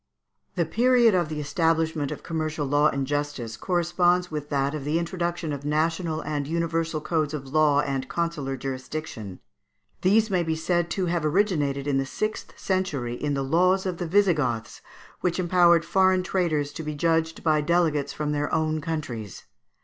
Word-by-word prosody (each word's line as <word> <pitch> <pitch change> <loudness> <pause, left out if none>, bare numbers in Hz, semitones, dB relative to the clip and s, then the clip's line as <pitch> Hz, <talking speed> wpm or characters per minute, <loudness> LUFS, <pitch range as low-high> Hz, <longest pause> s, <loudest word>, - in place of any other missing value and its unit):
] - - -48
The - - +1
period 240 -2 +4
of 175 -4 +1
the 155 -1 -4
establishment 160 0 0
of - - -7
commercial 155 -2 -2
law 145 +2 +3
and 135 -1 -2
justice 145 -5 -3
corresponds 175 +2 +1
with 150 -1 -5
that 140 0 0
of 150 -3 -4
the 150 +3 0
introduction 170 -2 -2
of 140 -1 -6
national 160 +2 0
and 145 -2 -3
universal 165 -1 -1
codes 155 -2 -1
of 135 -2 -7
law 150 -2 +4
and 135 -2 -3
consular 155 -6 -2
jurisdiction. 130 - -6 0.6
These 215 +3 +3
may 185 -2 +2
be 160 -1 -1
said 170 +1 0
to 190 0 -1
have 170 -2 -1
originated 150 -5 +1
in 140 -2 +1
the 135 - -2
sixth 215 +9 -4
century 155 -11 -1
in 145 +3 -2
the 135 - -1
laws 180 +7 +2
of 185 -2 -2
the 175 - -2
Visigoths, 155 - +1 0.4
which 180 -2 0
empowered 175 -2 +4
foreign 185 +1 +3
traders 160 -6 0
to - - -6
be 150 -1 -4
judged 160 +1 0
by 155 -2 +3
delegates 150 -3 +1
from 150 -1 -3
their 145 0 -1
own 155 0 0
countries. 130 - -5
155 Hz, 170 wpm, -25 LUFS, 145-175 Hz, 0.6 s, period